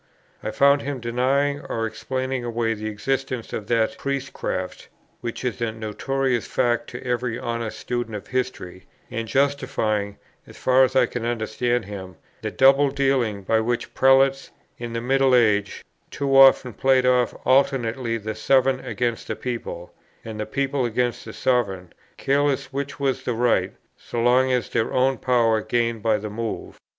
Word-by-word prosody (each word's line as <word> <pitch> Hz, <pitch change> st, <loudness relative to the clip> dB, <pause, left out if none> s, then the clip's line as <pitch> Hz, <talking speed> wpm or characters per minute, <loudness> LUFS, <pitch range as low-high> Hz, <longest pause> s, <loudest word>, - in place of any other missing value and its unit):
I -, -, -3 dB
found 140 Hz, 0 st, +4 dB
him 140 Hz, -1 st, -4 dB
denying 130 Hz, +4 st, 0 dB
or 115 Hz, 0 st, -1 dB
explaining 130 Hz, +2 st, -3 dB
away 115 Hz, -1 st, -1 dB
the 110 Hz, 0 st, -5 dB
existence 130 Hz, +3 st, -3 dB
of 105 Hz, -, -4 dB
that 115 Hz, +3 st, +1 dB
Priestcraft, 140 Hz, -9 st, -4 dB, 0.3 s
which 120 Hz, +2 st, -5 dB
is 120 Hz, -2 st, -3 dB
a 115 Hz, -1 st, 0 dB
notorious 120 Hz, +3 st, -2 dB
fact 120 Hz, -1 st, 0 dB
to 120 Hz, -, -8 dB
every 125 Hz, -1 st, -1 dB
honest 115 Hz, -2 st, -4 dB
student 120 Hz, -3 st, -3 dB
of 105 Hz, -1 st, -7 dB
history, 125 Hz, -8 st, -4 dB, 0.2 s
and 115 Hz, 0 st, -3 dB
justifying 130 Hz, -7 st, 0 dB, 0.3 s
(as -, -, -14 dB
far 130 Hz, +1 st, +4 dB
as 130 Hz, 0 st, +1 dB
I 130 Hz, -2 st, +5 dB
can 120 Hz, 0 st, -5 dB
understand 120 Hz, 0 st, -1 dB
him) 95 Hz, -3 st, -8 dB, 0.3 s
that -, -, -5 dB
double 135 Hz, +2 st, +6 dB
dealing 135 Hz, -7 st, 0 dB
by 110 Hz, +4 st, +2 dB
which 120 Hz, +2 st, -2 dB
prelates, 135 Hz, +1 st, +4 dB, 0.3 s
in 120 Hz, -1 st, -5 dB
the 115 Hz, -, -2 dB
middle 135 Hz, +1 st, +3 dB
age, 105 Hz, -4 st, +2 dB, 0.2 s
too 140 Hz, -1 st, -1 dB
often 135 Hz, -2 st, +6 dB
played 130 Hz, +3 st, +3 dB
off 125 Hz, -1 st, +2 dB
alternately 130 Hz, -3 st, +2 dB
the 110 Hz, 0 st, -5 dB
sovereign 130 Hz, +4 st, +2 dB
against 120 Hz, -2 st, -3 dB
the -, -, -3 dB
people, 115 Hz, -8 st, -6 dB, 0.3 s
and 110 Hz, -1 st, -7 dB
the 105 Hz, -, -3 dB
people 135 Hz, +3 st, -1 dB
against 120 Hz, 0 st, -1 dB
the -, -, -8 dB
sovereign, 95 Hz, -8 st, -1 dB, 0.2 s
careless 140 Hz, -1 st, 0 dB
which 140 Hz, +1 st, -4 dB
was 135 Hz, -2 st, 0 dB
in -, -, -18 dB
the 125 Hz, -, 0 dB
right, 105 Hz, -6 st, +2 dB, 0.2 s
so 120 Hz, -, -5 dB
long 125 Hz, +2 st, +3 dB
as 125 Hz, -2 st, 0 dB
their 115 Hz, -1 st, 0 dB
own 130 Hz, +1 st, +2 dB
power 115 Hz, -3 st, +2 dB
gained 115 Hz, -1 st, -1 dB
by 110 Hz, 0 st, +2 dB
the 105 Hz, 0 st, -6 dB
move. 115 Hz, +1 st, -5 dB
120 Hz, 165 wpm, -23 LUFS, 115-135 Hz, 0.3 s, double